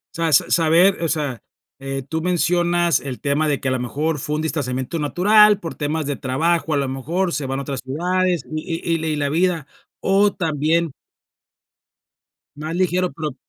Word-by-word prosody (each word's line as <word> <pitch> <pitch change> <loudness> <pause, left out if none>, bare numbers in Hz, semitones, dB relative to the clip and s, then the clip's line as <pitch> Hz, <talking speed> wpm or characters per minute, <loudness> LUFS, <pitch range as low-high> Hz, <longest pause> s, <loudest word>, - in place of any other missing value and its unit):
Sabes 165 -4 +3
saber, 170 +3 +4
o 165 - +1
sea 145 -6 -2 0.4
eh, 135 0 -4
tú 160 +2 -2
mencionas 175 0 +2
el 135 -3 -6
tema 145 +2 0
de 145 -2 0
que 130 - -4
a - - 0
la 130 - 0
mejor 150 +6 -2
fue 150 +3 -3
un 155 - -2
distanciamiento 135 -1 -2
natural, 210 +7 +5
por 165 - -6
temas 150 +1 -2
de 145 0 -2
trabajo, 160 +6 0
a - - +2
lo 140 -1 0
mejor 165 +8 -2
se 140 -2 -2
van 135 +1 -2
a - - -4
otras 135 -1 -4
ciudades, 175 +4 0
y 165 +1 -3 0.2
y 160 - -3
y 155 -1 0
la 145 -1 -1
vida, 165 0 +1 0.4
o 200 +1 +3
también 160 -1 0 1.6
Más 155 +2 -5
ligero, 180 0 +1
pero 150 -2 -5
160 Hz, 180 wpm, -21 LUFS, 140-175 Hz, 1.6 s, natural